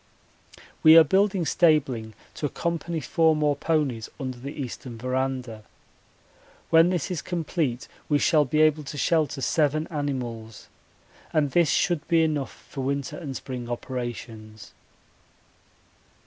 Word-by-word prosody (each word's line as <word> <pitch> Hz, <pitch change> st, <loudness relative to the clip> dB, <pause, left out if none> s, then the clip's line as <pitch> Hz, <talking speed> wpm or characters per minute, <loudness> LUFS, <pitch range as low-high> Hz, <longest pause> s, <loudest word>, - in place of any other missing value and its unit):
We 160 Hz, +1 st, +8 dB
are 165 Hz, -, +10 dB
building 190 Hz, +2 st, +2 dB
stabling 135 Hz, -, +2 dB, 0.2 s
to 150 Hz, -, -2 dB
accommodate 170 Hz, 0 st, -3 dB
four 160 Hz, -1 st, +3 dB
more 150 Hz, -1 st, +1 dB
ponies 140 Hz, -7 st, -1 dB
under 130 Hz, -3 st, -5 dB
the 140 Hz, +4 st, -8 dB
eastern 125 Hz, -2 st, -6 dB
verandah. 130 Hz, -2 st, -3 dB, 1.1 s
When 165 Hz, +1 st, +6 dB
this 180 Hz, -2 st, -2 dB
is 175 Hz, -, -2 dB
complete 155 Hz, -8 st, -2 dB, 0.2 s
we 145 Hz, -, +4 dB
shall 150 Hz, +1 st, +3 dB
be 150 Hz, +3 st, +1 dB
able 155 Hz, -1 st, +3 dB
to 145 Hz, -, -7 dB
shelter 150 Hz, -2 st, +1 dB
seven 155 Hz, +2 st, +1 dB
animals, 125 Hz, -7 st, -5 dB, 0.6 s
and 150 Hz, -3 st, +1 dB
this 170 Hz, -1 st, +3 dB
should 170 Hz, -5 st, +1 dB
be 165 Hz, -1 st, +3 dB
enough 150 Hz, -4 st, -3 dB
for 135 Hz, -, -6 dB
winter 140 Hz, 0 st, -2 dB
and 140 Hz, -6 st, -6 dB
spring 125 Hz, -3 st, -6 dB
operations. 115 Hz, -4 st, -6 dB
145 Hz, 130 wpm, -25 LUFS, 125-160 Hz, 1.1 s, are